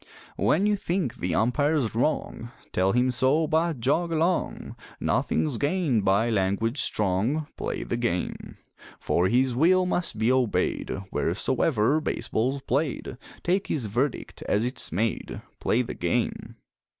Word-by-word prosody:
When 190 Hz, +6 st, +2 dB
you 210 Hz, 0 st, +3 dB
think 175 Hz, -9 st, -2 dB
the 85 Hz, -2 st, -2 dB
umpire's 135 Hz, +1 st, +1 dB
wrong, 120 Hz, -1 st, -1 dB, 0.2 s
Tell 95 Hz, +1 st, +2 dB
him 125 Hz, +3 st, +2 dB
so, 130 Hz, +6 st, +2 dB
but 160 Hz, -1 st, 0 dB
jog 155 Hz, +8 st, +1 dB
along; 165 Hz, +3 st, -1 dB, 0.2 s
Nothing's 145 Hz, -7 st, 0 dB
gained 145 Hz, -, +1 dB
by 100 Hz, +5 st, +2 dB
language 110 Hz, +5 st, 0 dB
strong 105 Hz, +10 st, 0 dB
Play -, -, -3 dB
the 120 Hz, -, -3 dB
game! 115 Hz, -7 st, -3 dB, 0.4 s
For 90 Hz, +2 st, +1 dB
his 125 Hz, +4 st, +2 dB
will 180 Hz, +7 st, +4 dB
must 180 Hz, -1 st, 0 dB
be 110 Hz, +3 st, +2 dB
obeyed 130 Hz, -4 st, 0 dB, 0.2 s
Wheresoever 120 Hz, -, +1 dB
baseball's 130 Hz, +1 st, -1 dB
played, 135 Hz, -2 st, -2 dB, 0.2 s
Take 190 Hz, +3 st, +1 dB
his 135 Hz, -7 st, -1 dB
verdict 120 Hz, +6 st, -2 dB
as 105 Hz, +3 st, +2 dB
it's 125 Hz, +2 st, -2 dB
made 110 Hz, +7 st, -2 dB, 0.2 s
Play -, -, +1 dB
the -, -, -6 dB
game! -, -, -2 dB
130 Hz, 135 wpm, -26 LUFS, 110-155 Hz, 0.4 s, will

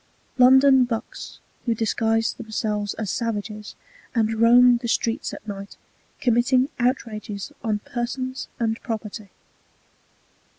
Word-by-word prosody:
[Footnote 250 Hz, -, +5 dB
1: 255 Hz, -, +7 dB
London 265 Hz, -1 st, +6 dB
"bucks" 240 Hz, -, -6 dB, 0.3 s
who 230 Hz, -, +2 dB
disguised 225 Hz, +1 st, 0 dB
themselves 215 Hz, -3 st, -3 dB
as 215 Hz, -4 st, -3 dB
savages 210 Hz, -2 st, -4 dB, 0.4 s
and 225 Hz, -1 st, +2 dB
roamed 240 Hz, +2 st, +6 dB
the 240 Hz, -, -4 dB
streets 230 Hz, 0 st, -1 dB
at -, -, -10 dB
night, 200 Hz, -1 st, -7 dB, 0.4 s
committing 250 Hz, +2 st, +2 dB
outrages 220 Hz, -3 st, -2 dB
on 215 Hz, -3 st, 0 dB
persons 255 Hz, +2 st, -4 dB
and 225 Hz, -1 st, -1 dB
property. 215 Hz, -3 st, -6 dB
230 Hz, 120 wpm, -23 LUFS, 215-245 Hz, 0.4 s, 1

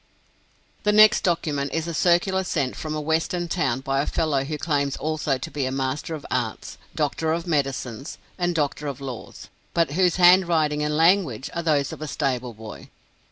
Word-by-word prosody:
The 210 Hz, -, +2 dB
next 215 Hz, +1 st, +6 dB
document 150 Hz, -6 st, -1 dB
is 165 Hz, -1 st, -1 dB
a 170 Hz, -, -4 dB
circular 180 Hz, +3 st, +2 dB
sent 140 Hz, -8 st, -1 dB
from 155 Hz, -1 st, -4 dB
a -, -, -2 dB
Western 160 Hz, +3 st, -1 dB
town 135 Hz, -8 st, -1 dB
by 135 Hz, 0 st, 0 dB
a -, -, -3 dB
fellow 150 Hz, -4 st, 0 dB
who 150 Hz, +2 st, -4 dB
claims 140 Hz, -3 st, -1 dB
also 150 Hz, -2 st, -1 dB
to 130 Hz, -, -7 dB
be 140 Hz, -3 st, -2 dB
a -, -, -2 dB
master 135 Hz, +4 st, -2 dB
of 150 Hz, -, -9 dB
arts, 120 Hz, -4 st, -3 dB, 0.2 s
doctor 155 Hz, +1 st, 0 dB
of 165 Hz, +1 st, -1 dB
medicines, 135 Hz, -5 st, -2 dB, 0.2 s
and 175 Hz, -1 st, -1 dB
doctor 150 Hz, -1 st, -1 dB
of 140 Hz, -1 st, -5 dB
laws, 130 Hz, -4 st, -8 dB, 0.3 s
but 165 Hz, -4 st, +2 dB
whose 180 Hz, +2 st, +2 dB
handwriting 170 Hz, -4 st, +4 dB
and 150 Hz, 0 st, 0 dB
language 165 Hz, -, +2 dB
are 170 Hz, -, -2 dB
those 150 Hz, -4 st, +1 dB
of -, -, -10 dB
a 155 Hz, -, -4 dB
stable 130 Hz, -5 st, -2 dB
boy. 110 Hz, -1 st, -10 dB
150 Hz, 185 wpm, -24 LUFS, 135-170 Hz, 0.3 s, next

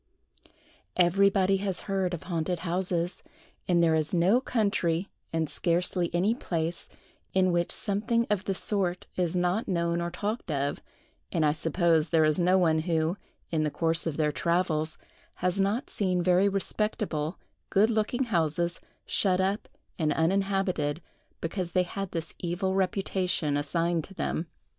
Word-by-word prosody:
EVERYBODY 195 Hz, +2 st, +4 dB
has 195 Hz, -1 st, -1 dB
heard 190 Hz, -3 st, -1 dB
of 165 Hz, -, -10 dB
haunted 170 Hz, -1 st, -2 dB
houses; 175 Hz, 0 st, -1 dB, 0.5 s
and 175 Hz, -1 st, +3 dB
there 165 Hz, -1 st, +4 dB
is 155 Hz, +2 st, +1 dB
no 190 Hz, +9 st, +4 dB
country, 200 Hz, -8 st, 0 dB, 0.2 s
and 160 Hz, -1 st, 0 dB
scarcely 175 Hz, +2 st, 0 dB
any 185 Hz, +6 st, +2 dB
place, 170 Hz, -8 st, -3 dB, 0.5 s
in 185 Hz, -1 st, +4 dB
which 175 Hz, 0 st, +1 dB
something 225 Hz, +3 st, 0 dB
of 205 Hz, -1 st, 0 dB
the 195 Hz, -, -1 dB
sort 185 Hz, -3 st, -1 dB
is 180 Hz, -1 st, 0 dB
not 180 Hz, +5 st, +1 dB
known 170 Hz, -1 st, 0 dB
or 170 Hz, -, -1 dB
talked 205 Hz, +4 st, -4 dB
of; 140 Hz, -1 st, -1 dB, 0.5 s
and 160 Hz, -, +2 dB
I 150 Hz, -, +4 dB
suppose 165 Hz, 0 st, +1 dB
there 160 Hz, -1 st, +4 dB
is 155 Hz, +3 st, +2 dB
no 180 Hz, +2 st, +4 dB
one 160 Hz, -4 st, +3 dB
who, 160 Hz, +1 st, 0 dB, 0.4 s
in 160 Hz, -2 st, +1 dB
the 155 Hz, -, +1 dB
course 165 Hz, +2 st, +1 dB
of 155 Hz, -, -2 dB
their 150 Hz, -1 st, +2 dB
travels, 160 Hz, -1 st, 0 dB, 0.4 s
has 180 Hz, +2 st, 0 dB
not 205 Hz, +6 st, 0 dB
seen 185 Hz, -3 st, 0 dB
very 185 Hz, +3 st, +4 dB
respectable, 195 Hz, -5 st, -1 dB, 0.3 s
good 215 Hz, +4 st, +4 dB
looking 225 Hz, +4 st, 0 dB
houses 170 Hz, -, 0 dB, 0.2 s
shut 185 Hz, -2 st, +2 dB
up 195 Hz, +3 st, 0 dB, 0.3 s
and 155 Hz, -2 st, +2 dB
uninhabited, 185 Hz, -3 st, 0 dB, 0.4 s
because 175 Hz, +1 st, -3 dB
they 185 Hz, -, +4 dB
had 195 Hz, +2 st, -5 dB
this 165 Hz, -2 st, -5 dB
evil 180 Hz, +2 st, -1 dB
reputation 185 Hz, -5 st, 0 dB
assigned 165 Hz, +3 st, 0 dB
to 195 Hz, -, -14 dB
them. 165 Hz, -1 st, -2 dB
175 Hz, 150 wpm, -28 LUFS, 165-195 Hz, 0.5 s, EVERYBODY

